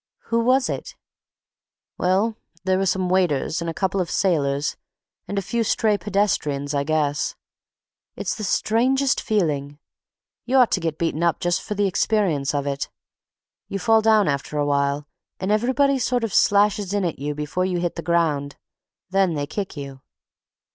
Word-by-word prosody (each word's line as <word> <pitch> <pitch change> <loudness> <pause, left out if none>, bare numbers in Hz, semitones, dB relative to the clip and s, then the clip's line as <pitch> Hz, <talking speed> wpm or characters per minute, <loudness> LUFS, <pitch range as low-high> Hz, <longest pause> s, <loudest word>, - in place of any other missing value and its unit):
"Who 230 - +3
was 255 +3 +3
it?" - - -5 1.0
"Well, 195 +5 +2 0.3
there 185 0 +1
were 195 - +1
some 185 0 +1
waiters 175 -3 +1
and 170 - -2
a - - -3
couple 190 0 0
of 175 - -3
sailors 145 -6 +1 0.5
and 200 - -4
a 195 - 0
few 235 +5 -1
stray 215 -1 +2
pedestrians, 175 -9 -1
I 140 -1 +1
guess. 150 -1 0 0.8
It's - - -2
the 215 - -6
strangest 255 +7 +2
feeling. 145 - -1 0.7
You 260 +2 +1
ought 250 -3 +5
to - - +2
get 165 -3 -2
beaten 165 -1 -1
up 170 -1 +2
just 175 0 0
for 210 - -5
the 205 0 +1
experience 180 -8 +1
of 140 -1 -1
it. 140 -1 -2 0.8
You 195 - -3
fall 225 +2 +3
down 215 -2 +4
after 140 +1 -2
a 145 - +1
while 140 0 0 0.3
and 190 +2 -1
everybody 260 +5 +2
sort 245 0 0
of 225 - -2
slashes 205 -1 +3
in 200 -2 +1
at 170 - -3
you 145 +1 -3
before 150 +5 -2
you 180 -2 -1
hit 175 -1 -1
the - - -4
ground—then 170 +3 -1
they 145 -1 -1
kick 190 +2 -5
you." 135 -2 -7
185 Hz, 170 wpm, -23 LUFS, 150-210 Hz, 1.0 s, ought